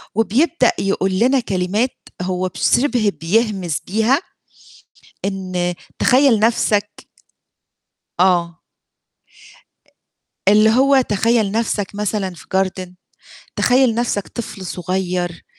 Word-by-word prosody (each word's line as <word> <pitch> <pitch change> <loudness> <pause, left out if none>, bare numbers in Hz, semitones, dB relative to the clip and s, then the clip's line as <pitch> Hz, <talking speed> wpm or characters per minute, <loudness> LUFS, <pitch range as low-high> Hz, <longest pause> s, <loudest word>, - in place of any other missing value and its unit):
وبيبدأ 250 +6 +2
يقول 190 -1 0
لنا 260 +4 +3
كلمات 200 +4 -1 0.3
هو 185 0 -2
بشِبه 240 +1 +1
بيهمس 190 -3 0
بيها 225 - +2 1.1
إن 185 -2 -2 0.3
تخيّل 255 -3 +4
نفسك 210 -2 0 1.1
آه. 175 -2 +2 1.9
اللي 215 +2 +6
هو 265 +3 +4
تخيّل 220 -1 +1
نَفْسك 210 -3 -2
مثلًا 205 -2 -2
في - - -14
garden 185 -1 -1 0.7
تخيّل 250 -2 +3
نَفْسك 230 -4 -2
طفل 215 -5 -7
صغير 180 -1 -3
205 Hz, 90 wpm, -19 LUFS, 185-235 Hz, 1.9 s, اللي